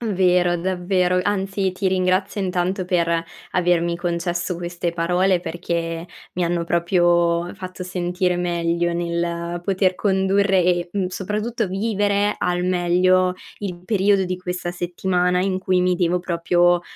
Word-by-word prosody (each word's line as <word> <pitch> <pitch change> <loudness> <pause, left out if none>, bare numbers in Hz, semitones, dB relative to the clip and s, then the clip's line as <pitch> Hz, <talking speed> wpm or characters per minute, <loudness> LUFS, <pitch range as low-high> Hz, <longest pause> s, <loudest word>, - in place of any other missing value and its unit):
Vero, 180 -4 +2
davvero, 180 0 +1
anzi 195 -1 -1
ti 190 +1 -1
ringrazio 185 +2 0
intanto 185 0 -1
per, 170 -2 +1 0.3
avermi 170 -1 +1
concesso 175 +1 -2
queste 175 0 -3
parole 180 +2 +1
perché, 170 -1 -3 0.3
mi 180 - 0
hanno 170 0 0
proprio 170 0 +2
fatto 185 -1 -8
sentire 180 0 -1
meglio 170 -1 0
nel 170 0 -2
poter 190 -1 +2
condurre 190 -1 +2
e, 175 0 +1
mhmm, 195 -2 0
soprattutto 210 +5 -2
vivere 205 +1 0
al 180 0 0
meglio 180 +1 +3 0.3
il 180 -3 -5
periodo 200 -2 +3
di 185 0 -3
questa 180 -1 -4
settimana 180 +1 0
in 190 0 0
cui 185 -1 +1
mi 180 0 +2
devo 175 0 +1
proprio 175 0 +2
180 Hz, 130 wpm, -22 LUFS, 175-190 Hz, 0.3 s, meglio